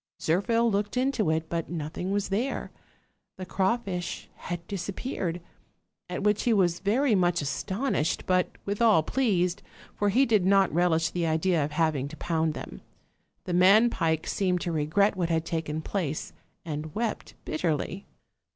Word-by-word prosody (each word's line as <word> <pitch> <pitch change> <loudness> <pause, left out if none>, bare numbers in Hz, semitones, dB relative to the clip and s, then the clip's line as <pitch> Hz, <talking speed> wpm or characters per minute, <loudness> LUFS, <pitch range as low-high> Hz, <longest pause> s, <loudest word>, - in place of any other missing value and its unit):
Zirphil 230 +8 +2
looked 205 +4 -1
into 255 -8 +1
it, 160 0 0
but 165 -1 -3
nothing 170 +2 -4
was 200 0 -1
there; 230 +8 -2 0.7
the 185 - -6
craw 190 +5 +1
fish 185 -7 -5
had 175 -1 -6
disappeared, 190 -2 -3 0.7
at 180 +2 -4
which 210 0 +2
he 240 - +2
was 175 -4 +2
very 230 +6 +2
much 175 -3 +2
as 140 - -3
tonished, 195 - -1
but 185 -1 +2 0.2
withal 205 -3 +3
pleased: 180 - +1 0.3
for 205 - +1
he 255 +7 +4
did 215 -6 +3
not 195 -1 +4
relish 165 -1 +2
the 175 -2 -1
idea 160 0 +2
of 145 +1 -4
having 155 -4 +1
to 155 +2 -10
pound 160 -2 0
them. - - -8 0.6
The 180 - -4
man 200 +7 +6
pike 160 -5 0
seemed 180 -3 0
to 175 - -2
regret 165 +7 +2
what 175 -2 -1
had 165 -1 0
taken 160 -2 -3
place, 160 -7 -3 0.3
and 155 -1 -5
wept 230 0 -3
bitterly. 165 +4 -2
180 Hz, 160 wpm, -27 LUFS, 160-205 Hz, 0.7 s, man